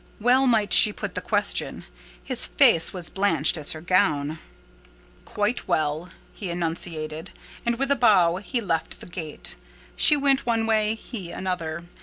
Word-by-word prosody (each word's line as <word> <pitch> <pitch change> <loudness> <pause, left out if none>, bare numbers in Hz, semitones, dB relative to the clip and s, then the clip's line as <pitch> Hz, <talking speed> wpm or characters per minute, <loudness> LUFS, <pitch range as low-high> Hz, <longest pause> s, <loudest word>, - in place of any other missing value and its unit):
Well 255 +4 +3
might 220 -4 +2
she 210 - +8
put - - -7
the - - -4
question: - - -1 0.4
his 255 -2 +1
face 235 - +4
was 180 -4 -5
blanched 165 -7 +2
as 155 -3 -1
her 155 - -9
gown. 160 -4 0 0.9
"Quite 210 +4 -3
well," 155 +3 -1 0.2
he 195 - -7
enunciated; 165 -1 -4 0.4
and, 235 0 0
with 275 +2 -2
a - - +4
bow, 185 -8 +3
he 235 +5 -3
left 165 -6 -3
the - - -11
gate. 165 -4 -6 0.4
She 300 - +5
went 275 -1 +1
one 230 -2 0
way; 215 -1 +1
he 215 -5 -8
another. 170 -3 -5
190 Hz, 155 wpm, -24 LUFS, 165-230 Hz, 0.9 s, she